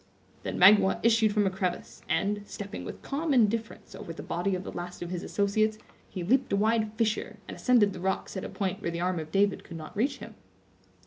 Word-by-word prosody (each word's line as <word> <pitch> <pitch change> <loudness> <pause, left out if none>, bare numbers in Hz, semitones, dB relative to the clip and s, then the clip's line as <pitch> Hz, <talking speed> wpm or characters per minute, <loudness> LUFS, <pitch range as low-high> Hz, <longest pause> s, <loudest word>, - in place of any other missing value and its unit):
Then - - -4
Magua 190 +1 +6
issued 225 -2 +4
from 205 -1 +2
a 190 - +1
crevice, 185 -2 -3
and, 205 +1 +1
stepping 205 0 -7
with - - -8
calm 290 +1 -1
indifference 225 -1 0
over - - -8
the 165 - -8
body 180 +3 -1
of 185 - -4
the - - -6
last 175 0 -6
of 175 - -6
his 180 -1 -3
associates, 215 +2 +1 0.3
he 185 - -5
leaped 255 +8 +2
a - - +3
wide 220 +1 +2
fissure, 220 -1 -1
and - - -7
ascended 230 -6 +3
the 185 - -8
rocks 190 +3 -2
at 190 - -3
a - - -5
point 195 0 -3
where 170 - -1
the 170 0 -4
arm 180 0 0
of 155 -1 -7
David 200 0 +2
could 170 - -9
not 155 +5 -9
reach 265 +6 0
him. 230 - -10
200 Hz, 220 wpm, -28 LUFS, 185-220 Hz, 0.3 s, Magua